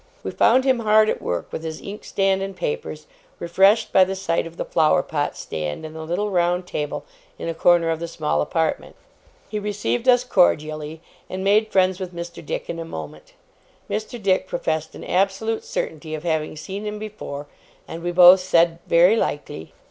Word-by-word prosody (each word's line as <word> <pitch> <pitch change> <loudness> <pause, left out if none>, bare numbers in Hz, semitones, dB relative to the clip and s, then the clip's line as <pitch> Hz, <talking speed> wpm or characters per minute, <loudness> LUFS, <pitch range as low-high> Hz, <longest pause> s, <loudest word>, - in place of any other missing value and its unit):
We - - -3
found 255 +3 +4
him 260 -2 +3
hard 215 -1 +4
at - - -4
work 85 -1 -3
with 160 - -4
his 160 -1 -5
inkstand 195 -1 -1
and 195 0 -4
papers, 465 -1 -4 0.3
refreshed 195 +6 +3
by 190 - +7
the 190 +1 -2
sight 170 -3 -1
of 165 +1 -13
the - - -3
flower 155 -2 +3
pot 145 -2 -2
stand 75 - -5
and 155 0 -9
the 160 - -6
little 180 +6 -2
round 175 0 +1
table 150 -4 -4 0.3
in - - -6
a 165 - -1
corner 170 0 +3
of 160 - -2
the 170 - -4
small 75 - -1
apartment. 160 - -1 0.5
He 210 - -3
received 210 +4 -1
us 250 0 +5
cordially, 155 -7 +1 0.3
and 190 0 -4
made 215 +2 +3
friends 185 -1 +2
with 185 -2 -6
Mr. 170 0 -7
Dick - - -4
in 165 - -5
a - - -3
moment. 75 - -9 0.5
Mr. 220 +3 -4
Dick 190 -2 +1
professed 160 -3 -2
an - - -9
absolute 195 +4 0
certainty 155 0 -4
of 155 - -8
having 160 -3 -1
seen 190 +7 -6
him 210 0 -4
before, 210 -9 -7 0.4
and 165 - -7
we 175 +1 -2
both 180 +1 +8
said, 170 -2 +2
'Very 175 +5 +5
likely. 145 - -3
175 Hz, 185 wpm, -22 LUFS, 160-200 Hz, 0.5 s, both